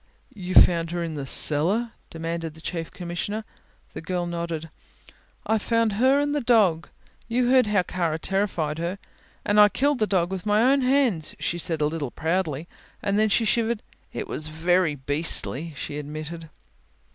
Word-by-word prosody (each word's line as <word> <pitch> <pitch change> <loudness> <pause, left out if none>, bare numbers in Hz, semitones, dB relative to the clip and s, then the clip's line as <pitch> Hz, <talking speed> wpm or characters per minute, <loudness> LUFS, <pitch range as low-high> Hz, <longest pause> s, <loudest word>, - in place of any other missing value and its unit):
"You 185 -4 -5
found 165 -1 +6
her 175 0 -2
in 165 -1 -4
the 140 -3 -5
cellar?" 185 - +2 0.2
demanded 165 -1 -5
the - - -13
Chief 165 0 -5
Commissioner. 185 +5 -5 0.5
The - - -6
girl 175 +1 -2
nodded. 170 -2 -4 0.7
"I 220 0 +1
found 230 0 +1
her 260 +6 +3
and 290 0 0
the 295 - 0
dog 210 -9 +3 0.4
you 245 +1 +1
heard 255 -3 +5
how 205 -3 +2
Kara 170 -3 -2
terrified 165 -4 -1
her 170 +3 -3 0.5
and 205 +1 +3
I 210 0 +8
killed 280 +4 +1
the 215 - +2
dog 180 -3 +1
with 190 -2 -4
my 210 +1 +3
own 280 - +2
hands," 255 - +1
she 175 - -2
said 165 -2 -1
a - - +3
little 150 -3 -2
proudly, 160 0 -2 0.4
and 200 +1 +1
then 215 0 +3
shivered. 225 +1 +1 0.3
"It - - -5
was 155 - -4
very 165 +1 +1
beastly," 145 +2 -1
she 145 +1 -5
admitted. 155 +2 -7
175 Hz, 170 wpm, -25 LUFS, 160-215 Hz, 0.7 s, I